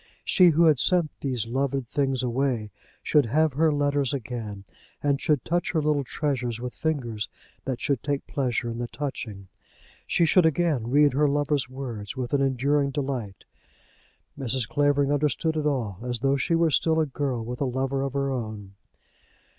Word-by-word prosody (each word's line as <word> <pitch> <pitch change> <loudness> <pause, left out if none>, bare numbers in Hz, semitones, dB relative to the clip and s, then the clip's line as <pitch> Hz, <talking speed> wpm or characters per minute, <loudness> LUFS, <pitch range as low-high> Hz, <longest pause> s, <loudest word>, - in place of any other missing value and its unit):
She, 185 - +5
who 165 +1 +3
had 155 -5 +4
sent 175 -2 +3
these 125 -5 -2
loved 135 +1 -1
things 135 -1 0
away, 120 -3 -1 0.3
should 145 -5 +3
have 155 +4 +2
her 155 +3 +3
letters 145 -1 +1
again, 110 -6 -6 0.4
and 140 -1 +1
should 150 -5 +1
touch 175 0 0
her 160 - +2
little 150 -2 +1
treasures 125 -4 -2
with 125 0 -5
fingers 120 -9 -2 0.4
that 130 -2 -2
should 140 -4 -1
take 140 -1 -2
pleasure 120 -4 -1
in 115 - -6
the 120 - -2
touching. 110 -9 -6 0.6
She 170 - +3
should 170 +1 +5
again 155 -7 0
read 145 +1 +4
her 145 +2 +3
lover's 145 -2 0
words 125 -4 -6
with 125 +1 -4
an 140 - +3
enduring 140 +2 +1
delight. 130 -8 -4 0.9
Mrs. 130 -3 -1
Clavering 145 +3 +2
understood 150 +2 0
it 150 -1 0
all, 115 -10 -2
as 120 0 -2
though 135 0 +3
she 155 +4 +1
also 165 - +1
were 160 - +3
still 160 +3 +2
a 160 - +3
girl 130 -5 -3
with 125 +3 -6
a - - +2
lover 135 +1 -1
of 135 -1 -2
her 140 -1 0
own. 110 -6 -5
135 Hz, 180 wpm, -26 LUFS, 120-145 Hz, 0.9 s, She